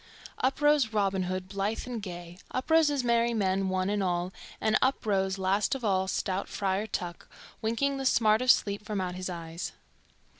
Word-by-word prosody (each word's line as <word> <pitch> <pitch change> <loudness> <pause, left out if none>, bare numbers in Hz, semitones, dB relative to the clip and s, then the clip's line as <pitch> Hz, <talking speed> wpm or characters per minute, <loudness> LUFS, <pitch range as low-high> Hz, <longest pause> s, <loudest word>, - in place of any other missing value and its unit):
Up 265 +3 0
rose 295 -6 +4
Robin 195 -3 +1
Hood, 185 0 -3
blithe 200 +3 -2
and 245 -3 -4
gay, 175 -2 -8
up 260 +5 -4
rose 320 -1 +6
his 285 -3 0
merry 235 0 +2
men 195 -2 +1
one 185 0 0
and 205 0 0
all, 180 0 -1 0.3
and 215 0 +2
up 260 -2 +1
rose 195 -2 +1
last 195 +6 +1
of 255 -4 -5
all 190 -2 +2
stout 190 +1 -2
Friar 200 +1 -1
Tuck, 175 -4 -5 0.3
winking 275 +6 0
the 270 - -4
smart 220 -2 +4
of 255 - -1
sleep 205 -3 +3
from 210 -2 -3
out 180 -1 -2
his 185 +1 -4
eyes. 165 -1 -5
200 Hz, 190 wpm, -29 LUFS, 185-235 Hz, 0.3 s, rose